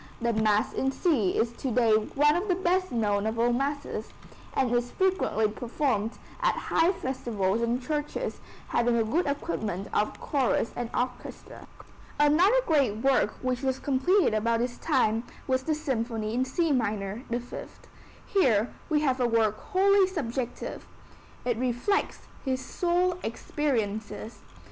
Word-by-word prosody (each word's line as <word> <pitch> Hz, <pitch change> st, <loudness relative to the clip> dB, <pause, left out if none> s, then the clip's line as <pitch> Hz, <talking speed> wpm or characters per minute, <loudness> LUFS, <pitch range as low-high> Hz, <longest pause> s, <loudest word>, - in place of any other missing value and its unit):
The 235 Hz, 0 st, 0 dB
Mass 215 Hz, -1 st, +2 dB
in 265 Hz, -, 0 dB
C 265 Hz, -, +1 dB
is 230 Hz, +1 st, +1 dB
to 265 Hz, -, -3 dB
day 235 Hz, -1 st, +3 dB
one 280 Hz, +8 st, +3 dB
of 360 Hz, +4 st, -1 dB
the 365 Hz, -, +2 dB
best 370 Hz, 0 st, +1 dB
known 210 Hz, -3 st, +1 dB
of 220 Hz, +1 st, -2 dB
all 240 Hz, +1 st, +3 dB
masses, 280 Hz, +3 st, -2 dB, 0.5 s
and 255 Hz, -3 st, +1 dB
is 240 Hz, 0 st, +1 dB
frequently 375 Hz, -, +1 dB
performed 230 Hz, 0 st, -1 dB, 0.3 s
at -, -, +2 dB
high 330 Hz, +3 st, +2 dB
festivals 235 Hz, -, -1 dB
in 235 Hz, +1 st, +1 dB
churches 295 Hz, +3 st, -3 dB, 0.3 s
having 240 Hz, 0 st, +2 dB
a 225 Hz, -, +3 dB
good 295 Hz, +11 st, 0 dB
equipment 220 Hz, -, -3 dB
of 210 Hz, -, 0 dB
chorus 265 Hz, -5 st, 0 dB
and 240 Hz, -1 st, -3 dB
orchestra. 250 Hz, 0 st, -5 dB, 0.5 s
Another 350 Hz, +12 st, +5 dB
great 275 Hz, -10 st, +2 dB
work 270 Hz, -5 st, +3 dB
which 255 Hz, -1 st, -1 dB
was 265 Hz, -1 st, 0 dB
completed 285 Hz, -, +2 dB
about 230 Hz, +2 st, +1 dB
this 240 Hz, 0 st, -2 dB
time 240 Hz, -7 st, +2 dB, 0.2 s
was 260 Hz, -1 st, +1 dB
the 310 Hz, +3 st, 0 dB
Symphony 230 Hz, -7 st, -2 dB
in 255 Hz, +2 st, +1 dB
C 325 Hz, +4 st, 0 dB
minor 210 Hz, -4 st, -1 dB
(The 240 Hz, +1 st, 0 dB
Fifth). 245 Hz, -, -10 dB, 0.4 s
Here 245 Hz, -, +2 dB, 0.2 s
we 300 Hz, -1 st, +2 dB
have 265 Hz, -3 st, +1 dB
a 245 Hz, -, +3 dB
work 220 Hz, -2 st, +2 dB
wholly 390 Hz, +1 st, +4 dB
subjective. 260 Hz, -9 st, -4 dB, 0.6 s
It 240 Hz, -2 st, 0 dB
reflects 255 Hz, -, 0 dB, 0.2 s
his 260 Hz, -2 st, -1 dB
soul 355 Hz, +4 st, 0 dB
experiences. 225 Hz, -4 st, -3 dB
250 Hz, 150 wpm, -28 LUFS, 225-300 Hz, 0.6 s, Another